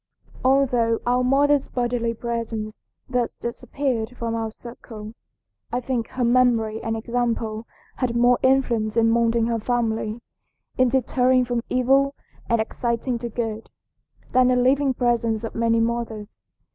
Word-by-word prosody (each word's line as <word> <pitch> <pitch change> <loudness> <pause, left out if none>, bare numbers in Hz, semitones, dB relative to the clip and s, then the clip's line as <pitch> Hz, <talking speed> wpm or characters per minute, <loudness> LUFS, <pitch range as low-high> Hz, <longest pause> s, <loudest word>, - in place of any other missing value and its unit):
"Although 250 -4 +3
our 250 +1 +2
mother's 280 +2 +3
bodily 240 -2 -1
presence 225 -2 -4 0.3
thus 250 -2 -1
disappeared 245 -1 -3
from 230 -1 -3
our 225 -1 -2
circle, 220 -2 -10 0.6
I 245 - 0
think 245 -2 -2
her 255 -1 -3
memory 235 -3 +2
and 225 0 -2
example 230 -1 -2 0.3
had 245 -2 -1
more 245 +1 +4
influence 235 -5 +2
in 225 0 +4
moulding 230 0 +2
her 230 -1 0
family, 225 -1 -1 0.6
in 255 -1 +3
deterring 255 0 +2
from 240 -1 -1
evil 270 +2 +2 0.3
and 230 -1 +2
exciting 235 +2 -2
to 235 0 -4
good, 225 -1 -4 0.6
than 255 0 +4
the 255 - +3
living 265 +2 +2
presence 235 -3 0
of 225 - -5
many 230 0 +2
mothers. 230 -2 -3
235 Hz, 135 wpm, -23 LUFS, 225-250 Hz, 0.6 s, more